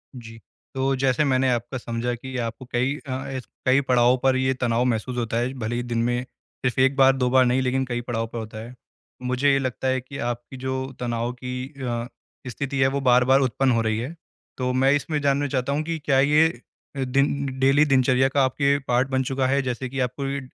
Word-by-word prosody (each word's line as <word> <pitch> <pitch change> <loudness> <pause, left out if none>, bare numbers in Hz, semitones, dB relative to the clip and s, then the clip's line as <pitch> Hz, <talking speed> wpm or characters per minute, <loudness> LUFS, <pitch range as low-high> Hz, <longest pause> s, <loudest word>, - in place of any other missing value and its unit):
जी। 115 -2 -10 0.4
तो 135 +1 +1
जैसे 130 +2 +1
मैंने 130 -1 +2
आपका 120 +2 -2
समझा 120 0 -3
कि 130 +2 -9
आपको 115 +1 -4
कई 130 +4 0
अ, 130 0 -4 0.3
कई 130 +2 +4
पड़ाव 125 -1 +3
पर 130 -1 +4
ये 130 0 +1
तनाव 120 -1 0
महसूस 125 +1 -1
होता 115 -1 -1
है। 125 +2 -1
भले 115 +1 -2
ही 120 - -2
दिन 120 -1 -3
में 120 +1 0
सिर्फ़ 125 0 -6
1 135 +1 +3
बार 135 -1 +5
2 125 -1 +1
बार 130 0 +5
नहीं 125 +2 +2
लेकिन 130 +1 0
कई 120 -1 -3
पड़ाव 115 -2 -3
पे 115 - -8
होता 110 -1 -6
है। 120 +2 -10 0.5
मुझे 130 +3 +1
ये 135 - +3
लगता 130 0 -3
है 130 0 +1
कि 135 +2 -10
आपकी 120 +2 -4
जो 130 +1 -3
तनाव 120 0 -2
की 125 +1 -4 0.2
अ, 120 -1 -2 0.4
स्थिति 135 +2 -4
है 130 - +5
वो 140 +1 -1
बार-बार 125 +1 +4
उत्पन्न 130 +1 +1
हो 115 -1 +2
रही 110 -1 0
है। 140 +8 -5 0.4
तो 125 -1 -1
मैं 135 +2 +3
इसमें 150 +1 -1
जानना 140 0 +1
चाहता 135 0 -1
हूँ 150 +2 -1
कि 165 0 -3
क्या 135 -2 +3
ये 150 -1 +3 0.4
दिन 140 +2 +1
डेली 135 +3 +4
दिनचर्या 130 -1 +3
का 135 0 +2
आपके 140 +2 +1
पार्ट 125 +2 +2
बन 130 0 +1
चुका 130 0 0
है 140 +1 +2
जैसे 125 0 -3
कि 135 +1 -5
आपको 125 +2 -2
ये 140 0 -2
130 Hz, 215 wpm, -24 LUFS, 120-135 Hz, 0.5 s, बार